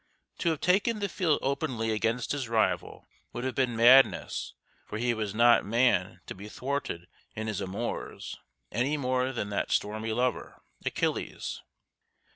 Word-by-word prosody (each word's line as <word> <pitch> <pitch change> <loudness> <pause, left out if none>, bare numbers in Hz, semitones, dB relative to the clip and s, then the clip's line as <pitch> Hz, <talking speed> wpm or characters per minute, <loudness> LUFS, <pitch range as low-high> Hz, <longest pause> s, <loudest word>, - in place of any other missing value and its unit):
To 170 - +2
have 160 -3 -1
taken 205 +5 +3
the 205 -1 -1
field 170 -5 +1
openly 120 -4 -1
against 115 +2 0
his 135 -5 -2
rival 115 -1 0 0.3
would 120 - -4
have 130 -1 -1
been 125 -3 0
madness 125 +4 +5 0.3
for 105 - -5
he 120 +1 +1
was 110 -2 -3
not 120 +1 +6
man 120 +4 +2
to - - -6
be 100 +3 -10
thwarted 130 -10 -3 0.3
in 110 - -3
his 110 -2 -3
amours, 100 +5 -5 0.3
any 130 +7 0
more 130 -1 0
than 110 -5 -3
that 100 - -1
stormy 110 +2 -1
lover, 125 +3 -2 0.2
Achilles. - - -2
120 Hz, 150 wpm, -29 LUFS, 110-135 Hz, 0.3 s, not